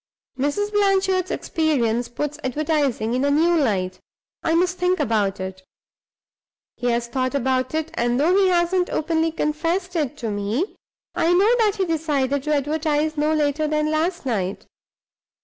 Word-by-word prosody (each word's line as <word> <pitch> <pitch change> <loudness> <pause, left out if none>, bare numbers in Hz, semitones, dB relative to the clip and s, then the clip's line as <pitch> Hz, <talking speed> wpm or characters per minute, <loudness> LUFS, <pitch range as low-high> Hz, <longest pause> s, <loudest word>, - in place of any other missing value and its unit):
Mrs. 290 +10 -1
Blanchard's 385 -2 +2
experience 245 -8 0
puts 295 +4 -4
advertising 275 -4 0
in 255 +2 0
a 285 - +2
new 325 +4 +3
light; 190 - 0 0.4
I 325 - +1
must 360 +1 +1
think 360 +1 +1
about 210 -4 0
it.' 190 0 -6 1.1
He 245 - -3
has 235 0 +1
thought 255 +3 -2
about 260 +1 0
it, 315 0 -2
and 240 -3 0
(though 335 +6 +3
he 390 -1 +4
hasn't 355 0 +2
openly 320 +1 0
confessed 330 +4 -2
it 295 -3 -1
to 230 -6 -3
me) 210 - -2 0.4
I 330 - +1
know 400 +6 +4
that 425 -3 +3
he 390 -3 0
decided 290 -5 0
to 300 +2 0
advertise, 305 +1 0
no 300 +1 +1
later 305 0 +1
than 305 0 0
last 330 +1 -1
night. 200 -6 -2
300 Hz, 155 wpm, -22 LUFS, 255-340 Hz, 1.1 s, he